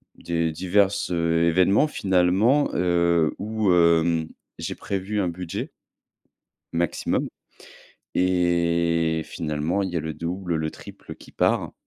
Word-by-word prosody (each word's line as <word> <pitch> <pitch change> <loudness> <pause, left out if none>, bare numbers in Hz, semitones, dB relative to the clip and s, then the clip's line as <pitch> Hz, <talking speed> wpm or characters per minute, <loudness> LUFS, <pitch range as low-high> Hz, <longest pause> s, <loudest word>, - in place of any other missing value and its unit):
des 85 -1 -2
diverses 95 +4 +1
événements 85 - +3
finalement, 95 +7 +2
heu, 85 -2 +2
où, 105 -1 0
hem, 85 -1 +3 0.3
j'ai - - -4
prévu 100 +1 -3
un 90 - 0
budget, 85 0 -5 1.0
maximum. 85 0 -1 0.9
Et 85 -2 +1
finalement, 80 +5 -2
il 95 - -3
y 90 - -4
a - - 0
le 80 +1 -4
double, 85 +2 -3
le 80 0 -2
triple - - -11
qui - - -16
part, - - 0
85 Hz, 115 wpm, -24 LUFS, 85-95 Hz, 1.0 s, événements